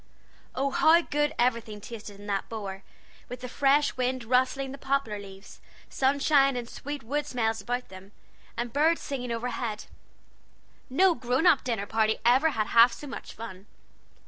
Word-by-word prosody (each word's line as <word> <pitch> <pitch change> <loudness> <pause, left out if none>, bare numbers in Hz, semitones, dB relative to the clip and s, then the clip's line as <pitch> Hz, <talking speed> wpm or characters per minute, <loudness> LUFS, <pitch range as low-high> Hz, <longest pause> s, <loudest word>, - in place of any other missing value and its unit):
Oh, 275 +1 0
how 320 +5 +5
good 295 -2 -1
everything 230 -3 0
tasted 210 -1 -9
in 205 - -11
that 200 -2 -2
bower, 200 -4 -6 0.5
with 250 0 -7
the 250 - -5
fresh 280 +3 +2
wind 255 0 -1
rustling 260 +3 +1
the 275 - -9
poplar 270 -6 -1
leaves, 195 0 -12 0.3
sunshine 275 0 +3
and 240 -1 -4
sweet 290 +2 -7
wood 290 +5 -2
smells 225 -4 -1
about 245 +1 -3
them, 190 +1 -12 0.5
and 240 0 -3
birds 320 +3 +3
singing 250 -4 -4
overhead! 230 -2 -3 1.0
No 360 +7 +4
grown 255 +2 -1
up 290 - +5
dinner 225 -5 -2
party 220 +1 +1
ever 260 +7 +5
had 220 -7 -1
half 235 +1 +7
so - - -9
much 275 - -8
fun. 200 -3 -9
250 Hz, 160 wpm, -27 LUFS, 220-275 Hz, 1.0 s, half